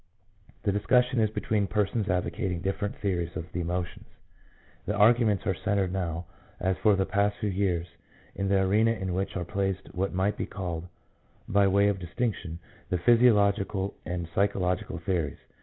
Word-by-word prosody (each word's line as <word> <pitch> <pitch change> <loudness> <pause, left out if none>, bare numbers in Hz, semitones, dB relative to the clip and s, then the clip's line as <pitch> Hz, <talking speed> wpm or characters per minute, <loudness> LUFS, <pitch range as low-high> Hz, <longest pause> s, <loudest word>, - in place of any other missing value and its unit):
The 100 - +2
discussion 125 +5 +2
is 110 -1 +3
between 105 -1 0
persons 105 +3 0
advocating 90 0 -1
different 100 +1 -2
theories 90 -4 -2
of 80 - -4
the 90 - -2
emotions. 90 +1 -4 0.8
The 105 - 0
arguments 110 -1 +4
are 95 - +2
centred 95 0 0
now, 85 -2 -2 0.3
as 95 +1 +1
for 105 -2 +4
the 95 0 +1
past 100 +1 +1
few 105 -2 -1
years, 90 -3 0 0.5
in 100 +1 -2
the 100 -1 +3
arena 110 +4 +3
in 95 -4 -3
which 95 +1 -2
are 90 - -3
placed 95 0 -2
what 95 +2 -1
might 95 +3 0
be - - -3
called 90 -3 -5 0.6
by 100 0 +4
way 100 +1 +4
of 100 -2 0
distinction 90 -2 -3 0.3
the 90 - +1
physiological 100 -2 +3
and 90 -1 -4
psycho 100 +1 +1
logical 90 -2 -1
theories. 85 -4 -2
95 Hz, 165 wpm, -28 LUFS, 90-105 Hz, 0.8 s, arguments